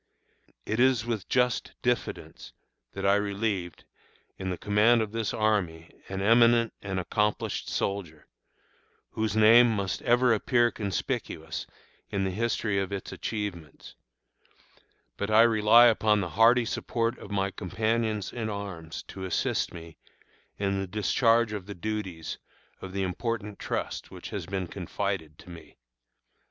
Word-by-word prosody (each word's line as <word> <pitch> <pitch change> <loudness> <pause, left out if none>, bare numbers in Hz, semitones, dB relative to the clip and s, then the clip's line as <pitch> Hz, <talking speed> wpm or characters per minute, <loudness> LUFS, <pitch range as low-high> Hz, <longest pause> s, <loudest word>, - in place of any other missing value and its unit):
It 110 - -2
is 125 -3 +3
with 115 -5 -3
just 125 -2 +1
diffidence 125 0 -3 0.4
that - - -4
I 100 - +5
relieved, 100 -3 -2 0.5
in 95 -1 -5
the 90 - -3
command 105 +5 +3
of 105 - -6
this 115 -1 -2
army, 100 -7 -1 0.2
an 95 0 -3
eminent 115 +1 +5
and 95 -2 -3
accomplished 105 +3 -1
soldier, 85 -7 -3 0.9
whose 110 -1 -2
name 115 +3 +7
must 100 -4 -2
ever 120 0 +4
appear 120 +2 +2
conspicuous 80 -5 -4 0.4
in 100 -1 -1
the 95 - -1
history 105 -1 0
of 95 0 -3
its 100 -1 -5
achievements; 100 -8 -6 1.2
but 100 - -2
I 110 +1 +7
rely 115 +1 +6
upon 110 -2 +4
the 90 -3 -2
hearty 115 +7 +4
support 115 +1 -2
of - - -10
my 100 -1 -1
companions 110 +1 -1
in 115 -3 -3
arms 95 -6 -6
to 95 -1 -6
assist 95 - -1
me 85 -1 -11 0.6
in 100 -1 -1
the 95 - -4
discharge 110 +3 +2
of 100 -3 -6
the 100 - -7
duties 95 -5 -4 0.4
of 95 - -7
the 95 0 -2
important 105 +2 -3
trust - - -4
which - - -9
has 95 -5 -5
been 95 -1 -2
confided 90 -3 -4
to 90 - -13
me. 85 -2 -13
105 Hz, 140 wpm, -28 LUFS, 95-115 Hz, 1.2 s, name